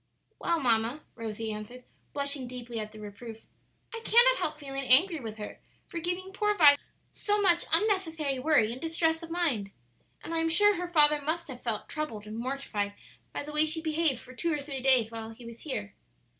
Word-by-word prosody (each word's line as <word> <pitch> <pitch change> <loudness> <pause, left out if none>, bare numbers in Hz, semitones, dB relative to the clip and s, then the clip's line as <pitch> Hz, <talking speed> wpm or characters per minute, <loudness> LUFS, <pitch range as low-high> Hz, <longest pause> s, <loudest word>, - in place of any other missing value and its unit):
"Well, 335 -1 +1
mamma," 240 +2 +1
Rosie 225 -1 -4
answered, 215 +4 -8 0.3
blushing 280 -2 -1
deeply 245 -2 -6
at 215 0 -5
the 215 - -12
reproof, 220 +2 -9 0.5
"I 460 - -5
cannot - - +6
help 305 -1 -2
feeling 275 -2 -5
angry 315 +7 +5
with 220 -4 -7
her 210 - -7 0.3
for 340 - -5
giving 360 +3 -3
poor 420 +1 +1
Vi 290 -3 +8 0.4
so 415 0 0
much 350 -4 +3
unnecessary 325 -7 +1
worry 255 -6 +3
and 250 - -7
distress 325 0 +1
of 335 - -8
mind. 305 - 0 0.5
And 330 - -5
I 330 - +2
am 325 0 +1
sure 415 +5 +5
her 355 0 -3
father 300 -3 +4
must 315 +2 -2
have 255 -2 -8
felt 225 -3 -3
troubled 265 -9 -4
and 215 +1 -7
mortified 235 -6 -3 0.4
by - - -4
the 300 +1 -8
way 300 +1 +4
she 315 +1 +1
behaved 315 -4 +1
for 255 - -13
two 335 +6 -1
or 300 - 0
three 280 -2 -4
days 250 -4 +4
while 225 -1 -6
he 225 +2 -12
was 235 0 -10
here." 100 - -4
285 Hz, 200 wpm, -29 LUFS, 235-330 Hz, 0.5 s, Vi